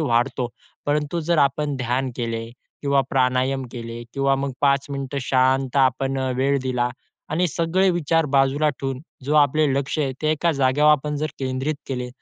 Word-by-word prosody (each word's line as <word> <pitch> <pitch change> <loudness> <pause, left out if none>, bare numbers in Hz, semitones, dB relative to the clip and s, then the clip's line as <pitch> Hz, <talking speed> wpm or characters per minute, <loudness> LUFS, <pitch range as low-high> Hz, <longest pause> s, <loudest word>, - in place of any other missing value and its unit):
वाढतो. 120 -2 +1 0.4
परंतु 150 +3 0
जर 170 -2 +3
आपण 145 +1 +2
ध्यान 130 +1 -1
केले 115 -2 -2 0.4
किंवा 140 -1 +3
प्राणायाम 130 +1 +1
केले 115 -1 -6
किंवा 135 0 +2
मग 140 0 -2
5 140 -1 +3
मिनिटं 140 0 -3
शांत 130 0 +2
आपण 135 0 +2
अ, 130 -1 -1
वेळ 140 +1 +2
दिला 125 -2 0 0.4
आणि 175 +4 +2
सगळे 170 +5 +1
विचार 165 -2 +1
बाजूला 140 +3 +3
ठेवून 135 -1 -4 0.2
जो 150 - 0
आपलं 150 0 +4
लक्ष 140 +3 -1
आहे, 135 -3 0
ते 155 - +2
एका 165 +2 +1
जागेवर 140 +1 +3
आपण 150 0 +1
जर 150 +2 -1
केंद्रित 130 +3 -2
केले, 125 -2 -3
135 Hz, 165 wpm, -23 LUFS, 130-150 Hz, 0.4 s, आपलं